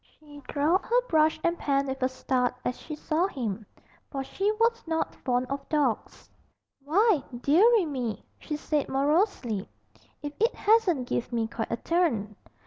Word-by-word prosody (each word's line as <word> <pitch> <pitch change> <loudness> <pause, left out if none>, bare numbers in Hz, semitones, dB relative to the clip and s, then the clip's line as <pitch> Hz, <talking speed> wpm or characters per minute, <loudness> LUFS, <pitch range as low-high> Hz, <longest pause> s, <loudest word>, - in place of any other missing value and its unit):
She 290 -1 -13
dropped 310 +6 +1
her - - +3
brush 315 -1 +3
and 340 0 +1
pan 275 -1 +1
with 265 0 -4
a 255 - +2
start 255 -1 0
as 250 - 0
she 305 - -6
saw 315 +4 0
him, 225 - -4 0.4
for 270 -2 -3
she 390 +9 -1
was 465 +1 +1
not 325 0 -1
fond 250 0 0
of 275 0 -4
dogs. 290 -7 -1 0.6
'Why, 365 +3 +3 0.2
deary 395 - +5
me,' 255 -7 -4
she 300 - -4
said 300 -1 -1
morosely, 275 - +1 0.5
'if 290 0 -4
it 455 +2 +2
hasn't 390 - +3
give 240 - -2
me 230 -2 0
quite 225 0 -4
a 230 - 0
turn. 235 - 0
290 Hz, 160 wpm, -27 LUFS, 255-345 Hz, 0.6 s, deary